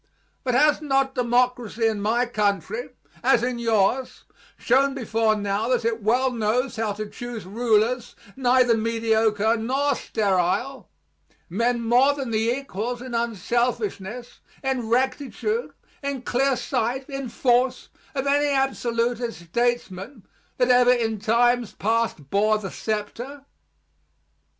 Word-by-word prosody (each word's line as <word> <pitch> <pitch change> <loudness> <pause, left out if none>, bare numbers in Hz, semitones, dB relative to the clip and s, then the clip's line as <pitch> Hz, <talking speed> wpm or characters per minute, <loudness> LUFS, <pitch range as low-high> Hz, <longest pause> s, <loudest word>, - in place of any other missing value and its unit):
But 250 -2 0
has 295 +3 +4
not 270 -2 +1
democracy 245 -2 +1
in 220 -2 +1
my 230 +4 +1
country, 210 - -1 0.3
as 240 -2 +4
in 245 -1 -1
yours, 230 +3 +1 0.3
shown 270 +3 +2
before 225 -3 +1
now 205 +1 -1
that 240 -2 +1
it 230 -1 0
well 250 +5 +2
knows 235 +2 0
how 220 -2 -1
to 215 +1 -5
choose 235 -2 -7
rulers 230 +3 +1 0.2
neither 250 -2 +3
mediocre 225 -1 +1
nor 270 +6 0
sterile; 205 +6 -1 0.6
men 235 +5 +1
more 250 +5 +4
than 270 -4 -4
the 220 +1 +1
equals 245 -2 -3
in 250 0 -8
unselfishness, 235 0 -2 0.2
in 260 -4 -1
rectitude, 280 - -1 0.3
in 280 -3 -4
clear 265 +2 +1
sight, 255 +1 -2
in 275 -3 -5
force, 250 +2 +1 0.3
of 270 0 -1
any 290 +1 +3
absolutist 240 - -1
statesman, 235 -1 -2 0.3
that 250 -1 +2
ever 250 0 +6
in 225 -3 0
times 235 +2 +2
past 225 -10 -1
bore 215 +2 +3
the 195 -3 -6
scepter? 240 +6 -5
240 Hz, 125 wpm, -24 LUFS, 220-255 Hz, 0.6 s, ever